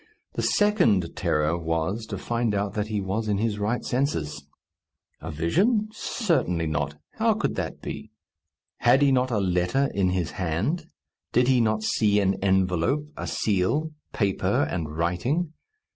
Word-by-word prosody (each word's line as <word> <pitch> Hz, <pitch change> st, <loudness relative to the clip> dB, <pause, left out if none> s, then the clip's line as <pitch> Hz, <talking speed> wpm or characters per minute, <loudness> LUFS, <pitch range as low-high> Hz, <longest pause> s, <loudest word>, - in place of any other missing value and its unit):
The -, -, -2 dB
second 120 Hz, -, +2 dB
terror 75 Hz, +2 st, +1 dB
was, 85 Hz, +6 st, -2 dB
to 100 Hz, -, -4 dB
find 115 Hz, +2 st, -1 dB
out 100 Hz, 0 st, -1 dB
that 105 Hz, 0 st, -2 dB
he 105 Hz, -1 st, -1 dB
was 100 Hz, +3 st, -2 dB
in 105 Hz, -1 st, +1 dB
his 105 Hz, 0 st, -1 dB
right 110 Hz, +4 st, -1 dB
senses. 80 Hz, -, -1 dB, 0.7 s
A 80 Hz, -, -7 dB
vision? 200 Hz, -, +1 dB
Certainly 165 Hz, -, 0 dB
not. 75 Hz, -1 st, -2 dB, 0.2 s
How -, -, +3 dB
could -, -, -1 dB
that -, -, -4 dB
be? -, -, -6 dB, 0.7 s
Had 135 Hz, +2 st, +4 dB
he 140 Hz, -, +5 dB
not 130 Hz, 0 st, +2 dB
a 115 Hz, -, 0 dB
letter 95 Hz, +8 st, +1 dB
in 95 Hz, -2 st, +2 dB
his 90 Hz, -3 st, -1 dB
hand? 105 Hz, -, -2 dB, 0.5 s
Did 125 Hz, +1 st, +4 dB
he 130 Hz, -2 st, +4 dB
not 110 Hz, -1 st, +1 dB
see 105 Hz, -1 st, +2 dB
an 95 Hz, -1 st, +2 dB
envelope, 95 Hz, -, +1 dB
a -, -, -5 dB
seal, 110 Hz, +11 st, 0 dB, 0.2 s
paper, 100 Hz, -, +1 dB
and 80 Hz, -3 st, -3 dB
writing? 125 Hz, -, 0 dB
105 Hz, 155 wpm, -25 LUFS, 90-130 Hz, 0.7 s, he